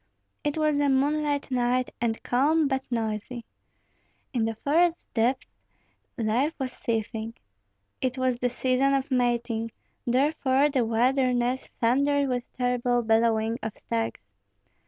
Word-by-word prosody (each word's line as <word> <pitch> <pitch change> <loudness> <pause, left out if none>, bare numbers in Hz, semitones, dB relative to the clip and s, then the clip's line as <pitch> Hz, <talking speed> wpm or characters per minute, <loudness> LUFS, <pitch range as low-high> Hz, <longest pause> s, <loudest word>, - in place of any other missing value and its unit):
It 295 0 -1
was 305 -2 +2
a 285 -1 +2
moonlight 285 +1 +1
night, 250 0 +1
and 225 -1 -1
calm, 295 +5 +2
but 265 -1 -1
noisy. 225 0 -3 0.9
In 235 -3 +1
the 225 0 -2
forest 330 +8 +1
depths 245 +3 0 0.7
life 240 +7 0
was 265 -2 -3
seething. 225 0 -3 0.7
It 255 0 -1
was 255 -1 +1
the 245 +1 0
season 260 +2 +1
of 270 0 -2
mating; 240 -2 0 0.4
therefore 275 +2 +2
the 260 -4 +1
wilderness 250 +2 +1
thundered 280 +4 +2
with 245 -1 -3
terrible 245 -1 +1
bellowing 225 0 +2
of 220 -1 -5
stags. 115 -2 -3
250 Hz, 125 wpm, -26 LUFS, 230-275 Hz, 0.9 s, was